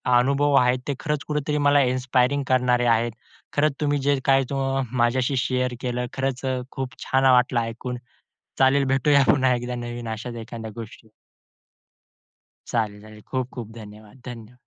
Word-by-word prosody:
अनुभव 140 +3 +3
आहेत 125 +1 +2
ते 140 - 0
खरंच 150 -2 -2
कुठेतरी 150 0 -1
मला 145 0 +4
इन्स्पायरिंग 130 +2 +1
करणारे 125 -1 +2
आहेत. 115 0 +2 0.4
खरंच 150 0 +2
तुम्ही 145 -1 +1
जे 140 +1 +2
काही 135 0 +4
तो 135 -1 0 0.2
माझ्याशी 125 +3 +2
शेअर 125 0 0
केलं, 125 0 -2
खरंच 135 0 -2
अ, 130 -1 0
खूप 130 -1 -5
छान 135 0 +1
वाटलं 125 -1 +3
ऐकून, 120 +2 -4 0.6
चालेल 135 +1 +4
भेटूया 140 +1 +4
पुन्हा 130 -3 +3
एकदा 125 +1 -3
नवीन 120 -1 -5
अशाच 120 +2 -6
एखाद्या 115 -1 -7
गोष्टी 115 0 -10 1.6
चालेल, 105 -3 -1
चालेल, 110 0 -13
खूप-खूप 125 -3 -4
धन्यवाद, 105 +4 -14
थँक 115 -2 -8
यू. 125 - -21
125 Hz, 150 wpm, -24 LUFS, 120-135 Hz, 1.6 s, मला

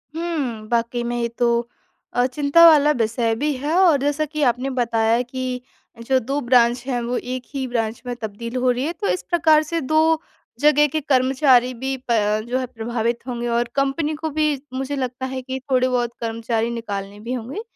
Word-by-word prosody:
हुँ, 280 -11 -3
वाक़ई 235 +1 0
में 240 0 -2
ये 235 - 0
तो 235 0 +1 0.4
अ, 245 - +2
चिंता 285 +5 +4
वाला 300 -2 +6
विषय 225 +1 +1
भी 295 +5 0
है 295 +4 -2
और 345 -6 +5
जैसा 290 +2 0
कि 305 0 -5
आपने 250 +2 +1
बताया 230 0 +2
कि 255 0 -4 0.4
जो 265 0 +3
2 275 +5 -2
ब्रांच 240 0 +3
हैं 245 -2 -1
वो 245 +1 -2
1 255 0 -4
ही 270 -1 -2
ब्रांच 230 -1 -2
में 245 -1 -3
तब्दील 230 +3 -6
हो 255 0 +2
रही 250 +2 -2
हैं। 335 - -2
तो 405 - 0
इस 365 - -1
प्रकार 315 -3 +4
से 330 +2 -3
2 315 +3 +2 0.4
जगह 295 0 +5
के 310 - +1
कर्मचारी 260 -2 +3
भी 265 +3 -3 0.2
प 215 -1 +2
जो 255 - 0
हैं 255 - -3
प्रभावित 235 0 -2
होंगे 240 -1 -3
और 235 0 0
कंपनी 280 +3 0
को 315 +1 -4
भी 300 -2 0
मुझे 270 +2 -3
लगता 255 -1 -3
है 260 0 -4
कि 260 +1 -5
थोड़े 255 0 +3
बहुत 240 -2 -1
कर्मचारी 230 0 -1
निकालने 205 -3 -5
भी 235 +4 -5
होंगे। 255 - -5
255 Hz, 195 wpm, -21 LUFS, 235-285 Hz, 0.4 s, वाला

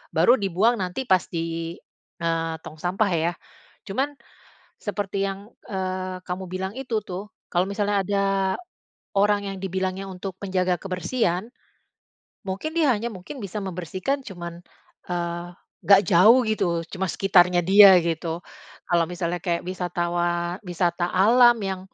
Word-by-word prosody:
baru 240 - +6
dibuang 200 +5 +2
nanti 185 +9 -3
pas 185 -3 +4
di, 165 0 -3 0.4
eee, 165 -1 0
tong 155 - -9
sampah 195 +4 +1
ya. 165 +2 0 0.5
Cuman 270 +9 -1 0.7
seperti 200 -1 -2
yang, 195 +2 -6 0.2
eee, 185 -2 -3
kamu 180 +1 -4
bilang 190 +1 -3
itu 240 -5 -2
tuh, 190 +2 -6 0.3
kalau 180 +1 +2
misalnya 200 0 0
ada 200 -1 +1 1.0
orang 205 0 +3
yang 195 - -6
dibilangnya 190 +1 -2
untuk 185 0 -6
penjaga 185 -2 0
kebersihan, 185 +1 -1 1.0
mungkin 195 +12 -3
dia 300 -6 +4
hanya 225 +2 -2
mungkin 195 +9 -9
bisa 200 +2 -4
membersihkan 185 - -3
cuma, 175 -3 -8 0.5
eee, 175 0 -2 0.4
enggak 195 0 +7
jauh 215 +7 +7
gitu, 215 -3 +1 0.3
cuma 190 0 -2
sekitarnya 180 -2 +4
dia 195 0 +9
gitu. 165 0 -2 0.5
Kalau 170 -1 +3
misalnya 175 0 -2
kayak 170 -1 0
wisatawan 175 -1 -1
wisata 175 -1 -1
alam 240 +5 +6
yang 190 -1 -3
185 Hz, 130 wpm, -24 LUFS, 175-200 Hz, 1.0 s, dia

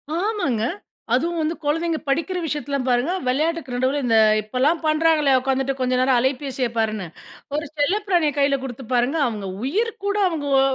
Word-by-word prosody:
ஆமாங்க. 350 - -1 0.5
அதுவும் 330 +6 +1
வந்து 315 +2 -1
கொழந்தைங்க 325 +2 0
படிக்கிற 335 +6 0
விஷயத்துல்லா 290 -2 -2
பாருங்க. 245 +7 +2 0.2
விளையாட்டுக்கு 300 +1 0
நடுவுல 260 +3 +1
இந்த 225 -2 +3 0.2
இப்பல்லாம் 260 +10 0
பண்றாங்களே, 310 -2 +3
உக்காந்துட்டு 270 +1 0
கொஞ்ச 255 0 0
நேரம் 255 0 +3
அலைபேசியப் 260 -2 -1
பாருன்னு. 215 -4 -1 0.5
ஒரு 300 0 -2
செல்லப் 380 +9 +1
பிராணிய 345 -6 +2
கைல 280 -1 +3
குடுத்து 260 -1 -7
பாருங்க. 250 +6 +2
அவங்க 210 -4 -4 0.2
உயிர்க்கூட 410 - -1
அவங்க 315 -4 -4
ஒ - - +5
285 Hz, 150 wpm, -22 LUFS, 255-330 Hz, 0.5 s, ஒ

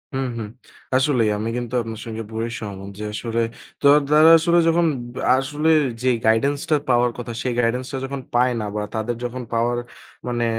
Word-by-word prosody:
হুম, 135 0 -1
হুম। 110 -2 -4 0.5
আসলেই 130 -5 +3
আমি 110 +2 -3
কিন্তু 120 0 -5
আপনার 110 -1 -6
সঙ্গে 115 -1 -5
পুরোই 115 +1 -3
সহমত 100 -2 -7
যে - - -5
আসলে, 115 +1 -3 0.4
তো - - -3 0.3
তারা 155 +2 +7
আসলে 170 +1 +2
যখন 170 +1 +3 0.3
বা - - -6 0.2
আসলে 150 +3 -1 0.3
যেই 130 -1 +2
গাইডেন্সটা 140 +7 +2
পাওয়ার 120 -1 +3
কথা 120 -1 -6
সেই 125 - -1
গাইডেন্সটা 125 +3 -1
যখন 135 0 -5
পায় 125 +1 +3
না 105 - -3
বা 105 - -1
তাদের 110 +2 -2
যখন 125 +1 -4
পাওয়ার 120 +1 +1 0.5
মানে 120 -1 0
120 Hz, 175 wpm, -22 LUFS, 115-135 Hz, 0.5 s, তারা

